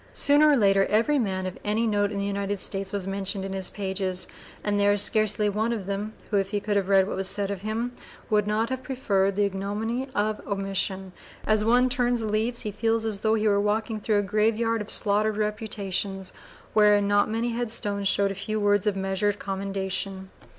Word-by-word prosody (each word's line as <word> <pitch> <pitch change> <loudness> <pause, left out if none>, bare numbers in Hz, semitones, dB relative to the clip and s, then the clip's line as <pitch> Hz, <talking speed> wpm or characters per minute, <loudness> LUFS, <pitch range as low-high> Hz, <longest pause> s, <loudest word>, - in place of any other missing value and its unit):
Sooner 295 +2 +5
or 290 - +5
later 195 -3 +4
every 230 +7 +2
man 190 -5 -1
of 185 - -6
any 215 +3 +1
note 205 -2 +1
in 205 - -4
the 200 - -1
United 200 0 -2
States 195 0 -2
was 200 -2 -3
mentioned 195 0 -3
in 195 - -5
his 190 -1 -1
pages, 190 -2 -3 0.4
and 205 -1 0
there 205 0 +4
is 205 - +4
scarcely 215 -1 +2
one 215 +3 0
of 215 -5 -3
them, 200 +2 -3 0.2
who, 205 - +2
if 195 -1 0
he 205 0 -1
could 205 0 -2
have 195 -1 0
read 195 -1 +5
what - - -3
was 190 0 -1
said 200 0 0
of 195 -2 -5
him, 220 +4 -2 0.4
would 210 -1 +1
not 220 +3 0
have 260 0 -2
preferred 200 -7 0
the 205 - +2
ignominy 210 +6 -3
of 210 +1 0
omission. 195 -1 -2 0.3
As 215 -1 +2
one 245 +3 +4
turns 245 -2 +1
the - - -2
leaves 220 +3 +1
he 215 - -4
feels 225 +2 0
as 210 -3 -2
though 220 0 +2
he 215 0 +1
were 200 -1 +3
walking 215 +1 -1
through 210 0 +1
a 205 - +2
graveyard 220 +3 +1
of 210 - -7
slaughtered 210 0 +2
reputations 205 -3 -2 0.4
wherein 210 -1 +4
not 205 +1 +3
many 225 +2 -1
headstones 220 -4 -1
show 200 +1 +2
a 195 - 0
few 215 +3 -3
words 205 -1 +2
of 205 - +2
measured 195 +1 0
commendation. 195 -1 -4
205 Hz, 210 wpm, -26 LUFS, 195-220 Hz, 0.4 s, Sooner